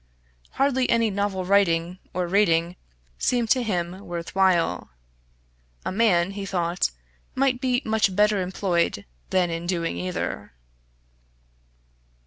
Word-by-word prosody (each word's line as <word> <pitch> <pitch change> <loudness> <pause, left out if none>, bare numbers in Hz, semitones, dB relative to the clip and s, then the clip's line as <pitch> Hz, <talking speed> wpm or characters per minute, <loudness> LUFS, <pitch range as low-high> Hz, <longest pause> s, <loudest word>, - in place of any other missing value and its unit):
Hardly 260 -2 +1
any 230 -2 +2
novel 195 -2 -2
writing, 180 -2 +2
or 180 0 -1
reading, 175 -2 +2 0.4
seemed 240 -3 +1
to 255 - +4
him 180 -5 -2
worth 175 -3 -6
while. 190 -3 +2 1.0
A - - -1
man, 190 -4 +2
he 200 0 -6
thought, 175 -2 0 0.5
might 260 -2 +1
be 255 0 +1
much 220 -3 +1
better 210 -1 +3
employed 180 - -1 0.2
than 180 -2 +1
in 165 +1 -4
doing 170 - -1
either. 90 -7 -4
190 Hz, 115 wpm, -24 LUFS, 170-215 Hz, 1.0 s, to